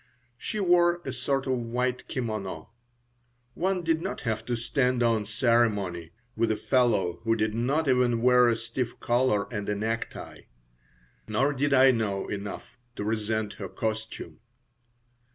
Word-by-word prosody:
She 215 Hz, -, -4 dB
wore 175 Hz, -2 st, +4 dB
a 130 Hz, -, -3 dB
sort 135 Hz, +1 st, -1 dB
of 130 Hz, -, 0 dB
white 125 Hz, +1 st, -2 dB
kimono. 110 Hz, -, -4 dB, 0.8 s
One 185 Hz, +3 st, -1 dB
did 165 Hz, -1 st, +1 dB
not -, -, -4 dB
have 110 Hz, -3 st, -2 dB
to 120 Hz, -, 0 dB
stand 125 Hz, +1 st, +1 dB
on 115 Hz, -3 st, +1 dB
ceremony 105 Hz, -7 st, +1 dB, 0.3 s
with 115 Hz, 0 st, +1 dB
a 110 Hz, -, +2 dB
fellow 115 Hz, -9 st, +1 dB
who 115 Hz, 0 st, +1 dB
did 110 Hz, -1 st, 0 dB
not 135 Hz, +7 st, 0 dB
even 125 Hz, -3 st, +2 dB
wear 125 Hz, -1 st, +6 dB
a 115 Hz, -, +2 dB
stiff 120 Hz, +1 st, -4 dB
collar 120 Hz, -4 st, +2 dB
and 105 Hz, -2 st, -3 dB
a 105 Hz, -, 0 dB
necktie. 110 Hz, +2 st, -4 dB, 0.8 s
Nor 130 Hz, +7 st, +1 dB
did 145 Hz, +1 st, 0 dB
I 135 Hz, -1 st, +7 dB
know 105 Hz, -5 st, -1 dB
enough 100 Hz, +4 st, -6 dB, 0.2 s
to -, -, -4 dB
resent 110 Hz, 0 st, -1 dB
her -, -, -5 dB
costume. 110 Hz, -1 st, -4 dB
115 Hz, 150 wpm, -27 LUFS, 110-130 Hz, 0.8 s, I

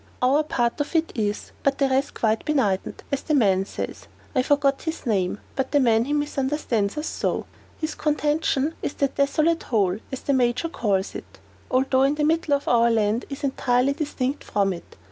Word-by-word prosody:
"Our 265 Hz, +4 st, +4 dB
part 240 Hz, -3 st, 0 dB
of 290 Hz, -, -4 dB
it 325 Hz, 0 st, +2 dB
is, 210 Hz, -3 st, -2 dB
but 275 Hz, 0 st, +1 dB
the 275 Hz, -, +3 dB
rest 270 Hz, +1 st, 0 dB
quite 220 Hz, -1 st, +1 dB
benighted. 220 Hz, -11 st, 0 dB
As 280 Hz, -, 0 dB
the 305 Hz, -, 0 dB
man 195 Hz, -7 st, +3 dB
says -, -, -6 dB, 0.3 s
I 260 Hz, -, +3 dB
forget 280 Hz, 0 st, +2 dB
his 320 Hz, -1 st, -5 dB
name, 200 Hz, -4 st, 0 dB, 0.2 s
but 265 Hz, -, -1 dB
the 290 Hz, -, +3 dB
man 230 Hz, -3 st, +3 dB
that 290 Hz, -, -2 dB
misunderstands 275 Hz, -6 st, -1 dB
us 300 Hz, -, -2 dB
so -, -, -2 dB, 0.3 s
his 315 Hz, -1 st, -2 dB
contention 300 Hz, -1 st, 0 dB
is -, -, -3 dB
that 275 Hz, -1 st, 0 dB
'Desolate 310 Hz, +4 st, +2 dB
Hole,' 200 Hz, -4 st, +1 dB
as 265 Hz, -, -5 dB
the 280 Hz, -, 0 dB
Major 250 Hz, +5 st, +1 dB
calls 200 Hz, -, -1 dB
it, -, -, -9 dB, 0.3 s
although 260 Hz, 0 st, +2 dB
in 275 Hz, +2 st, +3 dB
the 300 Hz, -, -1 dB
middle 315 Hz, -1 st, +2 dB
of 280 Hz, -, -5 dB
our 235 Hz, -1 st, +4 dB
land, 220 Hz, +1 st, +1 dB
is 275 Hz, 0 st, -7 dB
entirely 260 Hz, -1 st, +2 dB
distinct 285 Hz, -2 st, -2 dB
from 195 Hz, -2 st, 0 dB
it. 170 Hz, -, -11 dB
270 Hz, 190 wpm, -24 LUFS, 230-295 Hz, 0.3 s, Our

